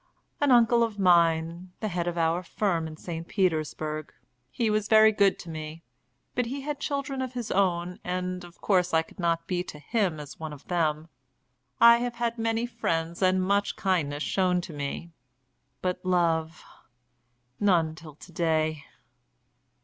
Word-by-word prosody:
"An 290 - +2
uncle 235 -1 +5
of 225 -3 0
mine, 170 -1 +2
the 215 - -2
head 175 -2 -2
of 175 0 -2
our 165 +1 +1
firm 175 -3 -1
in 155 0 -9
St. 165 0 -6
Petersburg. 155 -4 -1 0.4
He 230 - -1
was 210 -1 0
very 220 0 +7
good 200 -2 +3
to 170 - -10
me, 155 +1 -7 0.5
but 245 -1 0
he 275 +3 -4
had 295 +1 -4
children 280 -2 -2
of 255 -1 -4
his 240 -3 -4
own, 180 -2 0
and 180 0 -3
of 175 0 -14
course 180 -4 +2
I 160 - +4
could 160 - -19
not 165 -1 0
be 180 0 -1
to 150 - -9
him 175 +1 -1
as 145 -1 -9
one 160 -1 -5
of 140 - -13
them. 160 -2 -1 0.7
I 235 0 +8
have 240 0 -3
had 235 -1 -2
many 225 +1 0
friends 170 -8 -2
and 185 0 +3
much 200 +2 +1
kindness 160 -8 0
shown 185 -2 +1
to 175 -2 -9
me, 145 +4 -5 0.7
but 180 -1 -2
love! 165 -3 0 0.9
none 170 -6 +3
till 160 -2 -12
to 175 - -14
day." 155 -3 0
180 Hz, 165 wpm, -27 LUFS, 160-210 Hz, 0.9 s, I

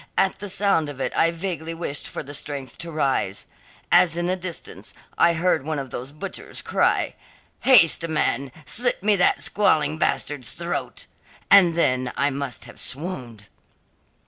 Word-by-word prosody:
At 190 - +1
the 205 - -5
sound 190 -6 +3
of 140 -2 -9
it - - -3
I 165 - +3
vaguely 165 -2 -5
wished 165 -4 -4
for - - -6
the 145 +1 -10
strength 140 -3 -5
to 170 0 -6
rise. 135 -10 -1 0.5
As 170 -2 +5
in 175 - -1
the 180 +1 0
distance, 180 -2 -6 0.2
I 170 - +4
heard 170 -3 +1
one 155 +1 -3
of 135 -3 -6
those 130 +3 -5
butchers 180 +6 -6
cry, - - +1 0.5
"Haste, 175 -10 +5
man; 140 -4 -1
slit 245 -4 +1
me 210 0 +4
that 180 - +3
squalling 155 -7 +2
bastard's 135 -6 0
throat!" 170 0 -4 0.5
And 180 -4 +7
then 130 -6 +1
I 140 +2 +2
must 135 -3 -4
have 120 - -12
swooned." 125 - -4
160 Hz, 160 wpm, -23 LUFS, 140-180 Hz, 0.5 s, And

